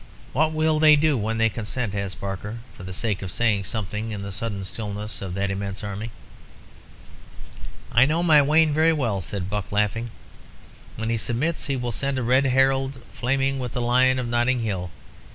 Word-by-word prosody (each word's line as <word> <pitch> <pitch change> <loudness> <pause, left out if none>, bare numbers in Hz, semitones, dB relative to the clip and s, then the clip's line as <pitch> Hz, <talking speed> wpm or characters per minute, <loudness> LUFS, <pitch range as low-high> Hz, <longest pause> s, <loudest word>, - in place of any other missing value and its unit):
"What 155 +3 +3
will 155 0 +1
they 155 -1 +7
do 150 0 +3
when 115 -1 -1
they 115 0 +4
consent?" 115 0 -3
asked 100 -2 -3
Barker, 100 +3 -5 0.2
for - - -12
the 95 0 -7
sake 100 +1 -2
of 95 -2 -5
saying 105 -3 +1
something 105 +1 -3
in 105 -2 -5
the 100 - -5
sudden 100 0 -4
stillness 105 +2 -5
of 95 -2 -5
that 100 0 -1
immense 100 +1 -4
army. 105 +2 -4 1.8
"I 120 +1 +6
know 165 +3 +1
my 155 -4 +6
Wayne 155 +2 +4
very 160 +2 +4
well," 115 -10 -1
said 95 0 -4
Buck, 100 -2 -4
laughing. 105 +3 0 0.9
"When 110 +1 -2
he 115 - +1
submits 125 +10 -1
he 140 - 0
will 125 -2 -2
send 135 +4 -1
a 130 - -1
red 130 +4 +3
herald 135 +1 +2 0.2
flaming 135 +2 0
with 125 -2 -4
the 125 - -2
Lion 130 +2 +3
of 125 -2 -2
Notting 120 +1 +1
Hill. 95 -5 -2
115 Hz, 190 wpm, -24 LUFS, 100-135 Hz, 1.8 s, they